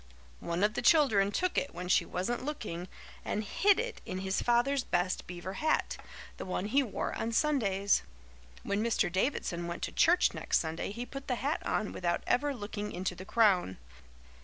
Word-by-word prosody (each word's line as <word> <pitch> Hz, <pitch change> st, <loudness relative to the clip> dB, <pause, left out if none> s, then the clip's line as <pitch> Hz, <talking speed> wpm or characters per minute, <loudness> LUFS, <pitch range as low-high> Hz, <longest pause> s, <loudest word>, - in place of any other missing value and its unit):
One 170 Hz, +3 st, -2 dB
of 210 Hz, +1 st, +3 dB
the -, -, -2 dB
children 220 Hz, -12 st, +4 dB
took 365 Hz, -, +1 dB
it 280 Hz, -, -6 dB
when 180 Hz, +1 st, -5 dB
she 180 Hz, -, +3 dB
wasn't 235 Hz, +8 st, -2 dB
looking 210 Hz, -, -4 dB, 0.4 s
and 210 Hz, -, -2 dB
hid 400 Hz, -, +3 dB
it 475 Hz, +1 st, -4 dB
in 185 Hz, -, -5 dB
his 190 Hz, 0 st, -1 dB
father's 250 Hz, +3 st, +2 dB
best 180 Hz, +1 st, -1 dB
beaver 180 Hz, +1 st, -6 dB
hat 310 Hz, +9 st, 0 dB, 0.4 s
the -, -, -5 dB
one 185 Hz, +1 st, -2 dB
he 265 Hz, +7 st, +3 dB
wore 245 Hz, -7 st, -3 dB
on 230 Hz, -, -2 dB
Sundays. 205 Hz, -9 st, +2 dB, 0.6 s
When 200 Hz, +2 st, 0 dB
Mr. 230 Hz, -6 st, +1 dB
Davidson 180 Hz, -4 st, -1 dB
went 170 Hz, -, -5 dB
to -, -, -2 dB
church 350 Hz, +2 st, +4 dB
next -, -, +1 dB
Sunday 160 Hz, +3 st, -3 dB
he 235 Hz, +4 st, -5 dB
put 275 Hz, +1 st, -8 dB
the 250 Hz, -, 0 dB
hat 280 Hz, +6 st, -2 dB
on 210 Hz, -, -1 dB
without 175 Hz, -1 st, -1 dB
ever 290 Hz, +3 st, +2 dB
looking 210 Hz, -2 st, -5 dB
into 185 Hz, +1 st, -2 dB
the 185 Hz, +1 st, -9 dB
crown. 190 Hz, -, +3 dB
210 Hz, 185 wpm, -31 LUFS, 185-275 Hz, 0.6 s, children